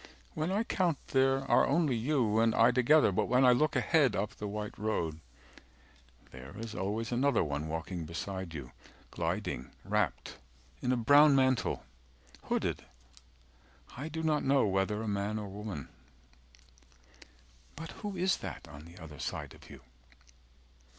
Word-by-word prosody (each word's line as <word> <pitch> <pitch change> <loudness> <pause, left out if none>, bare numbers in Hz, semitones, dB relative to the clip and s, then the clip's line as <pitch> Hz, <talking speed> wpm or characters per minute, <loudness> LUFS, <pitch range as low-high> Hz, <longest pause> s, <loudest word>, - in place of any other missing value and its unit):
When 155 +3 -2
I 205 +4 +1
count, 175 -8 0
there 135 0 +3
are - - +4
only 155 -7 +2
you 115 -3 +1
and 115 0 +3
I 115 +2 +6
together 130 +1 +4
360 - - -5
But - - +2
when 125 +2 +4
I 125 - +7
look 150 +4 +2
ahead 155 -6 +3
up 105 +2 -2
the 105 - -6
white 105 +1 -5
road 85 -8 -2 1.1
There 65 +6 -11
is 115 0 -6
always 110 +3 -3
another 135 +4 +2
one 75 0 -3
walking 80 +2 -4
beside 95 +2 -5
you 65 -5 -7 0.4
Gliding 65 - -3 0.2
wrapt - - -1 0.4
in 125 - 0
a 130 - +2
brown 145 +5 +6
mantle, 130 -2 +2 0.6
hooded - - -1 1.1
I 145 +5 -5
do 160 +1 -4
not 155 -2 +1
know 135 -2 +3
whether 100 +2 0
a - - -4
man 100 +1 -1
or 105 - -4
a - - -8
woman 100 -7 -6 1.9
—But 160 +2 -7
who 205 -3 -4
is 185 +2 +2
that - - -7
on 75 +1 -11
the 85 +2 -14
other 80 -5 -11
side - - -4
of - - -16
you? 70 -2 -12
115 Hz, 155 wpm, -31 LUFS, 95-140 Hz, 1.9 s, I